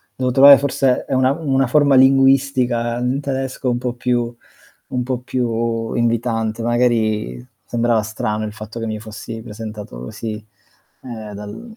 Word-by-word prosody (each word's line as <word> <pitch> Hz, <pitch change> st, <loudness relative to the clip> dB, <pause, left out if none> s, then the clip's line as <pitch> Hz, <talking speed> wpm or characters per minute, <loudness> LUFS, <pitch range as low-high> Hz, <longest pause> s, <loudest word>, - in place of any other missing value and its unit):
dovevo 130 Hz, -1 st, -1 dB
trovare 140 Hz, +1 st, +9 dB
forse 135 Hz, -2 st, 0 dB
ehm, 130 Hz, -, 0 dB
una 130 Hz, +1 st, +3 dB
una 135 Hz, -4 st, 0 dB
forma 140 Hz, +1 st, +4 dB
linguistica 130 Hz, -3 st, +3 dB
in 125 Hz, +3 st, -1 dB
tedesco 135 Hz, -1 st, -3 dB
un 120 Hz, -, 0 dB
po' 125 Hz, -1 st, -3 dB
più 120 Hz, -1 st, -1 dB, 0.6 s
un 125 Hz, -1 st, -1 dB
po' 125 Hz, 0 st, -2 dB
più 115 Hz, -2 st, -2 dB
invitante, 115 Hz, -1 st, -1 dB
magari 110 Hz, -, 0 dB, 0.2 s
sembrava 120 Hz, -1 st, +1 dB
strano 110 Hz, 0 st, -3 dB
il 105 Hz, -, -7 dB
fatto 110 Hz, +1 st, -8 dB
che 115 Hz, -, -3 dB
mi 110 Hz, -1 st, -3 dB
fossi 110 Hz, +1 st, -8 dB
presentato 105 Hz, -, -8 dB
così, 105 Hz, -, -6 dB, 0.6 s
ehm, 110 Hz, -4 st, -8 dB
dal 105 Hz, -, -9 dB
120 Hz, 150 wpm, -19 LUFS, 110-130 Hz, 0.6 s, trovare